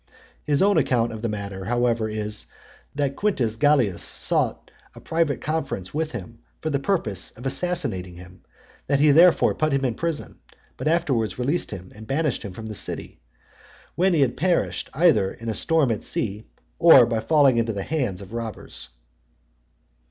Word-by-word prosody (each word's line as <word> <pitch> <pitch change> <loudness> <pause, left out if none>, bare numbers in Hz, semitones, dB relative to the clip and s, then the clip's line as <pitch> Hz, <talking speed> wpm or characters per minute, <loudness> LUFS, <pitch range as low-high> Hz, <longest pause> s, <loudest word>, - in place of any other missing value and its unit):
His 145 +3 +2
own 200 0 +4
account 120 -2 +1
of 110 -1 -7
the 115 - -1
matter, 100 -2 -5
however, 120 -1 0
is, 105 0 -3 0.5
that 140 -1 -1
Quintus 130 - 0
Gallius 125 -8 +2
sought - - -2 0.2
a - - -10
private 165 -3 -1
conference 145 - -3
with 155 +1 -2
him, 90 - -8 0.2
for 155 - -3
the 140 - 0
purpose 135 - -1
of 125 - -11
assassinating 135 - -1
him; 90 +1 -14 0.5
that 140 0 +2
he 150 0 +5
therefore 170 +4 +5
put 155 0 0
him 135 -1 +1
in 125 - 0
prison, 165 +4 -4 0.4
but - - -4
afterwards 135 - 0
released 140 +8 -1
him, 95 -2 -8
and 110 +1 -12
banished 150 0 0
him 100 -4 -7
the 110 - -6
city; 100 - -4 0.7
when 180 0 +2
he 140 -4 +4
perished 170 +9 -1
either 155 - +4
in 115 0 -7
a - - 0
storm 155 +2 +2
at 110 - -3
sea, 105 0 -3 0.3
or 160 -7 +8
by 115 -1 -1
falling 140 -1 +4
into 115 -1 +1
the 100 -2 -4
hands 125 - -2
of 100 - -13
robbers. 115 - -4
125 Hz, 165 wpm, -24 LUFS, 105-155 Hz, 0.7 s, or